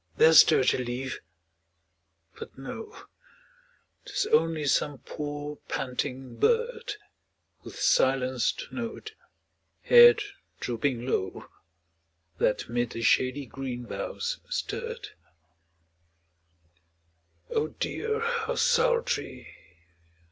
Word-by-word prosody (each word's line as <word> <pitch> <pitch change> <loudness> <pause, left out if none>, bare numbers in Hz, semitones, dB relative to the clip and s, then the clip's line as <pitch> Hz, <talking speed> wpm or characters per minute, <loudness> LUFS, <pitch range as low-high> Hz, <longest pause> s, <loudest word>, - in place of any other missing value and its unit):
there 160 - +6
stirred 130 -4 +7
a - - -1
leaf, 125 +1 -4 1.2
but - - -10
no, 385 - -8 1.0
Tis - - -2
only 165 - +2
some 145 +1 +1
poor, 145 +1 -6
panting 130 -1 -4
bird, 470 -1 +1 0.7
With - - -11
silenced 130 -2 +1
note, 235 - -6 0.7
head 475 -2 +8 0.4
drooping 120 0 -2
low, 95 -7 -2 0.9
That 105 - +1
'mid 120 0 -1
the 115 - -5
shady 130 +4 +2
green 125 -1 -6
boughs - - -4
stirred. 465 -3 -4 2.4
Oh 150 - +1
dear! 440 - -3
how 470 +1 -1
sultry! 485 0 0
150 Hz, 85 wpm, -27 LUFS, -, 2.4 s, head